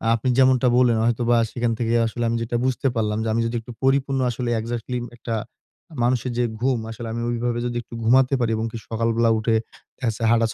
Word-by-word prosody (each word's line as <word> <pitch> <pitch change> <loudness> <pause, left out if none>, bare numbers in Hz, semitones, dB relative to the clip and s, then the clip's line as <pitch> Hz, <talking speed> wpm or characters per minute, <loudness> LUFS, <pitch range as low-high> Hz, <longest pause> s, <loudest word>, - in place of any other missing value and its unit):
আপনি 115 +3 -3
যেমনটা 130 -1 +4
বললেন, 125 -2 +4
হয়তোবা 120 0 +2
সেখান 120 -1 -1
থেকে 115 0 0
আসলে 120 +1 -4
আমি 115 - 0
যেটা 120 +1 -3
বুঝতে 130 +1 0
পারলাম 105 -1 0
যে, - - -2
আমি 115 - +1
যদি 115 +1 -2
একটু 120 - -10
পরিপূর্ণ 135 0 +2
আসলে 120 +1 -3
এক্সাক্টলি 120 +2 -3
উম 120 - -6
একটা 115 -1 -3 0.7
মানুষের 125 0 +1
যে 125 - +2 0.2
ঘুম, 130 -2 +1
আসলে 115 0 -7
আমি 115 - -3
ওইভাবে 120 0 -1
যদি 120 0 -2
একটু 115 - -16
ঘুমাতে 130 +4 +4
পারি 120 -2 +1
এবং 110 - -1
কি, - - -6
সকালবেলা 115 0 +1
উঠে 110 +1 +1 0.5
হাঁটা, 115 - +2
দেখাচ্ছে 115 0 +2
120 Hz, 205 wpm, -23 LUFS, 115-125 Hz, 0.7 s, যেমনটা